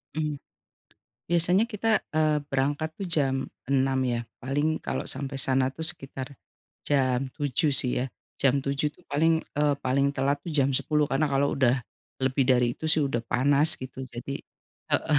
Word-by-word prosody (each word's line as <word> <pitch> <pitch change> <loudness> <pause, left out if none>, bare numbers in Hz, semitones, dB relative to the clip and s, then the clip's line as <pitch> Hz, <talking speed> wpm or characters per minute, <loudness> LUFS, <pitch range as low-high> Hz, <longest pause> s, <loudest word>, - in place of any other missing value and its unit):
Mmm. 150 -2 -2 0.9
Biasanya 180 +6 +3
kita, 220 0 +1
eee, 155 -1 +2
berangkat 145 +4 0
tuh 195 - -4
jam 145 -6 +1 0.3
6, 135 -1 +2
ya. 120 -2 0 0.2
Paling 145 +5 0
kalau - - -3
sampai 135 0 -4
sana 130 -1 +2
tuh 160 +4 -4
sekitar 135 -4 -4 0.5
jam 130 -2 +1
7 145 +1 0
sih 130 -2 +3
ya, - - -2 0.3
jam 140 0 +3
7 140 +2 0
tuh - - -24
paling, 160 +3 +3 0.2
eee, 145 -1 +3
paling 140 +2 +1
telat 140 +1 +1
tuh 170 - -4
jam 140 -3 +3
10 150 -1 +1
karena 135 +3 +1
kalau 140 +1 +2
udah 130 -1 +3 0.4
lebih 130 0 +2
dari 125 -2 +3
itu - - -10
sih 155 0 +3
udah 135 -5 -1
panas, 140 +6 +3
gitu, 130 0 -6
jadi 130 +2 -6 0.6
heeh, 150 -2 +3
140 Hz, 160 wpm, -27 LUFS, 130-155 Hz, 0.9 s, Biasanya